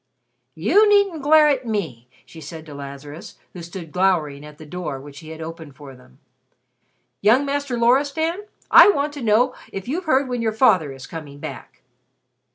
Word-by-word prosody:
"You 365 Hz, -, +4 dB
needn't 400 Hz, -6 st, +3 dB
glare 305 Hz, +2 st, +5 dB
at 265 Hz, -4 st, 0 dB
me!" 155 Hz, -, -4 dB, 0.2 s
she 160 Hz, -, -13 dB
said 155 Hz, +2 st, -9 dB
to 150 Hz, -, -11 dB
Lazarus, 140 Hz, +3 st, -10 dB, 0.2 s
who 180 Hz, -, -9 dB
stood 170 Hz, -1 st, -9 dB
glowering 165 Hz, -6 st, 0 dB
at 150 Hz, 0 st, -12 dB
the 155 Hz, -, -12 dB
door 150 Hz, -4 st, -5 dB
which 145 Hz, +1 st, -12 dB
he 160 Hz, -, -12 dB
had 160 Hz, 0 st, -9 dB
opened 160 Hz, -3 st, -9 dB
for 140 Hz, 0 st, -12 dB
them. 125 Hz, 0 st, -20 dB, 1.0 s
"Young 245 Hz, +7 st, +4 dB
Master 280 Hz, -3 st, -2 dB
Loristan, 285 Hz, -, +1 dB, 0.3 s
I -, -, +9 dB
want 290 Hz, -5 st, 0 dB
to 290 Hz, -, -8 dB
know 230 Hz, +2 st, +2 dB, 0.2 s
if 195 Hz, +1 st, -7 dB
you've 340 Hz, +8 st, -3 dB
heard 270 Hz, -3 st, +2 dB
when 245 Hz, -2 st, -3 dB
your 220 Hz, -1 st, -1 dB
father 190 Hz, -, +3 dB
is 135 Hz, -1 st, -10 dB
coming 150 Hz, -4 st, -9 dB
back?" -, -, -10 dB
185 Hz, 175 wpm, -21 LUFS, -, 1.0 s, I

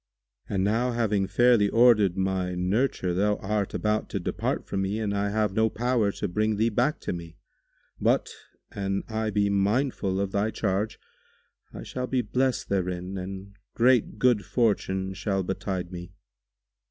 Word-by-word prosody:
And 95 Hz, -2 st, 0 dB
now, 115 Hz, +5 st, +1 dB
having 105 Hz, -4 st, +1 dB
fairly 110 Hz, +1 st, +4 dB
ordered 110 Hz, -6 st, +4 dB
my 95 Hz, -1 st, -1 dB
nurture 95 Hz, 0 st, 0 dB
thou 105 Hz, +3 st, +2 dB
art 105 Hz, 0 st, -2 dB
about 105 Hz, 0 st, 0 dB
to 100 Hz, -, -2 dB
depart 85 Hz, -, -2 dB
from 95 Hz, -, -2 dB
me 95 Hz, +2 st, -1 dB
and 105 Hz, -2 st, -1 dB
I 100 Hz, 0 st, 0 dB
have 105 Hz, -1 st, 0 dB
no 110 Hz, +2 st, +2 dB
power 115 Hz, -2 st, +1 dB
to 105 Hz, -, -3 dB
bring 105 Hz, +3 st, 0 dB
thee 110 Hz, +2 st, +2 dB
back 125 Hz, +7 st, +1 dB
to -, -, -3 dB
me; 85 Hz, -1 st, -8 dB, 0.6 s
but, -, -, +2 dB, 0.4 s
an 100 Hz, 0 st, -2 dB
I 110 Hz, -1 st, -2 dB
be 100 Hz, -1 st, +1 dB
mindful 100 Hz, -1 st, +1 dB
of 100 Hz, -1 st, -1 dB
thy 100 Hz, +2 st, +1 dB
charge, 105 Hz, 0 st, -1 dB, 0.7 s
I -, -, -8 dB
shall 125 Hz, 0 st, -4 dB
be 125 Hz, -1 st, 0 dB
blessed 125 Hz, +4 st, 0 dB
therein 90 Hz, -1 st, -2 dB
and 95 Hz, +1 st, -7 dB, 0.2 s
great 125 Hz, -1 st, +3 dB
good 120 Hz, -5 st, +3 dB
fortune 95 Hz, -5 st, 0 dB
shall 95 Hz, 0 st, -1 dB
betide 95 Hz, -1 st, -3 dB
me." 90 Hz, +1 st, -8 dB
100 Hz, 160 wpm, -26 LUFS, 95-110 Hz, 0.7 s, fairly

